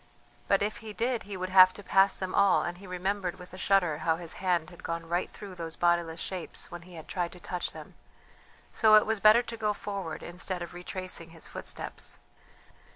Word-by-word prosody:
But 195 Hz, 0 st, +3 dB
if 210 Hz, +1 st, -2 dB
he 215 Hz, -1 st, -8 dB
did 235 Hz, +2 st, 0 dB
he 200 Hz, -, -4 dB
would 185 Hz, 0 st, -3 dB
have 185 Hz, 0 st, +8 dB
to 205 Hz, -, -9 dB
pass 195 Hz, +1 st, +4 dB
them 185 Hz, -1 st, -4 dB
all, 200 Hz, -1 st, +4 dB
and 175 Hz, 0 st, -4 dB
he 195 Hz, -, -11 dB
remembered 185 Hz, 0 st, -2 dB
with 180 Hz, 0 st, -12 dB
a -, -, -8 dB
shudder 180 Hz, -6 st, +2 dB
how 160 Hz, +1 st, +2 dB
his 170 Hz, -1 st, -6 dB
hand 175 Hz, -3 st, +1 dB
had 175 Hz, -, -13 dB
gone 165 Hz, 0 st, -4 dB
right 175 Hz, +2 st, -1 dB
through 200 Hz, -2 st, -9 dB
those 165 Hz, -2 st, -5 dB
bodiless 170 Hz, -1 st, +1 dB
shapes 185 Hz, -1 st, -4 dB
when 175 Hz, 0 st, -7 dB
he 180 Hz, 0 st, -13 dB
had 160 Hz, -, -10 dB
tried 175 Hz, -3 st, -2 dB
to 180 Hz, -, -12 dB
touch 180 Hz, +1 st, -3 dB
them, -, -, -11 dB, 0.8 s
so 215 Hz, -2 st, +6 dB
it 215 Hz, -, +7 dB
was 220 Hz, -1 st, 0 dB
better 215 Hz, +4 st, +7 dB
to 235 Hz, -1 st, -7 dB
go 210 Hz, -1 st, +1 dB
forward 195 Hz, -5 st, -5 dB
instead 180 Hz, +1 st, -3 dB
of 175 Hz, -, -9 dB
retracing 180 Hz, -1 st, -6 dB
his 165 Hz, -1 st, -9 dB
footsteps. -, -, -6 dB
185 Hz, 215 wpm, -29 LUFS, 175-200 Hz, 0.8 s, have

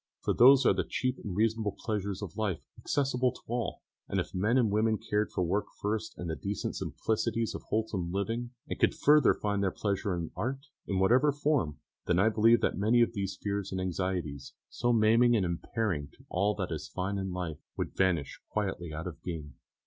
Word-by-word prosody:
For -, -, +1 dB
those 135 Hz, +2 st, +7 dB
are -, -, +6 dB
the -, -, 0 dB
cheap 130 Hz, 0 st, -2 dB
and 100 Hz, -6 st, -4 dB
reasonable 110 Hz, -1 st, +1 dB
pleasures 100 Hz, -3 st, -3 dB
of 90 Hz, -5 st, -7 dB
life, 105 Hz, -6 st, -2 dB
accessible 130 Hz, -3 st, 0 dB
to -, -, -14 dB
all; 115 Hz, -5 st, -3 dB, 0.3 s
and -, -, 0 dB
if -, -, -4 dB
men 105 Hz, +7 st, +2 dB
and 115 Hz, -5 st, +3 dB
women 110 Hz, +1 st, +2 dB
cared 105 Hz, +1 st, -1 dB
for 90 Hz, -, 0 dB
work 95 Hz, +5 st, 0 dB
first 110 Hz, +1 st, -2 dB
and 90 Hz, -, -5 dB
the 80 Hz, -, -2 dB
decent 100 Hz, +2 st, -3 dB
simplicities 110 Hz, +1 st, -1 dB
of -, -, -5 dB
wholesome 105 Hz, -6 st, -1 dB
living, 115 Hz, +5 st, -2 dB, 0.2 s
and -, -, -5 dB
could -, -, +3 dB
further 150 Hz, -2 st, +5 dB
find 100 Hz, -1 st, -1 dB
their 95 Hz, -, +2 dB
pleasure 100 Hz, -1 st, -1 dB
in 85 Hz, -2 st, -4 dB
art, 135 Hz, +4 st, -3 dB, 0.2 s
in 95 Hz, -, -1 dB
whatever 125 Hz, +10 st, +4 dB
form, 140 Hz, -, 0 dB, 0.3 s
then 90 Hz, -, +3 dB
I 100 Hz, +4 st, +5 dB
believe 115 Hz, +2 st, +4 dB
that -, -, 0 dB
many 115 Hz, +4 st, +4 dB
of 115 Hz, -, -1 dB
these 100 Hz, -2 st, -3 dB
fears 100 Hz, -1 st, -2 dB
and 95 Hz, -, -2 dB
anxieties, 90 Hz, -6 st, -3 dB, 0.2 s
so 120 Hz, 0 st, 0 dB
maiming 115 Hz, +2 st, +5 dB
and 100 Hz, -5 st, +2 dB
impairing 85 Hz, -2 st, -2 dB
to -, -, -21 dB
all 100 Hz, +4 st, +1 dB
that 95 Hz, -3 st, -3 dB
is 75 Hz, -1 st, -4 dB
fine 95 Hz, +2 st, -2 dB
in 95 Hz, -1 st, -3 dB
life, 90 Hz, -4 st, -4 dB, 0.2 s
would -, -, -3 dB
vanish 85 Hz, -7 st, 0 dB
quietly 95 Hz, -5 st, -2 dB
out 80 Hz, +3 st, -5 dB
of 85 Hz, -2 st, -7 dB
being. 80 Hz, -6 st, -6 dB
100 Hz, 200 wpm, -30 LUFS, 90-115 Hz, 0.3 s, those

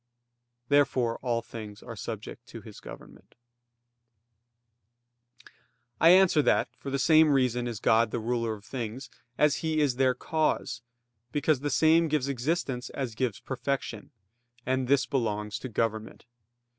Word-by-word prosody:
Therefore 130 Hz, -5 st, +2 dB
all 120 Hz, -2 st, -1 dB
things 105 Hz, -3 st, -9 dB
are -, -, -8 dB
subject -, -, -7 dB
to -, -, -10 dB
His -, -, -12 dB
government. -, -, -13 dB, 2.6 s
I 165 Hz, -, +6 dB
answer 180 Hz, -3 st, +6 dB
that, -, -, +2 dB
For 140 Hz, -, -6 dB
the 135 Hz, -, -1 dB
same 155 Hz, +3 st, +5 dB
reason 125 Hz, -3 st, +1 dB
is 115 Hz, -3 st, -5 dB
God 115 Hz, 0 st, +3 dB
the 120 Hz, -, -3 dB
ruler 115 Hz, -1 st, -1 dB
of 105 Hz, -1 st, -15 dB
things 120 Hz, 0 st, -6 dB, 0.3 s
as 150 Hz, -1 st, +3 dB
He 160 Hz, -1 st, -1 dB
is 140 Hz, -5 st, +1 dB
their 130 Hz, -1 st, +3 dB
cause, 155 Hz, -5 st, -1 dB, 0.5 s
because 145 Hz, 0 st, +1 dB
the 145 Hz, +2 st, -2 dB
same 160 Hz, +4 st, +4 dB
gives 150 Hz, -3 st, 0 dB
existence 135 Hz, -1 st, -2 dB
as 130 Hz, -4 st, -4 dB
gives 115 Hz, -2 st, -2 dB
perfection; 130 Hz, -4 st, -4 dB, 0.6 s
and 130 Hz, 0 st, 0 dB
this 140 Hz, +1 st, +3 dB
belongs 105 Hz, -6 st, -2 dB
to 130 Hz, -, -6 dB
government. 110 Hz, -1 st, -3 dB
130 Hz, 140 wpm, -28 LUFS, 115-145 Hz, 2.6 s, I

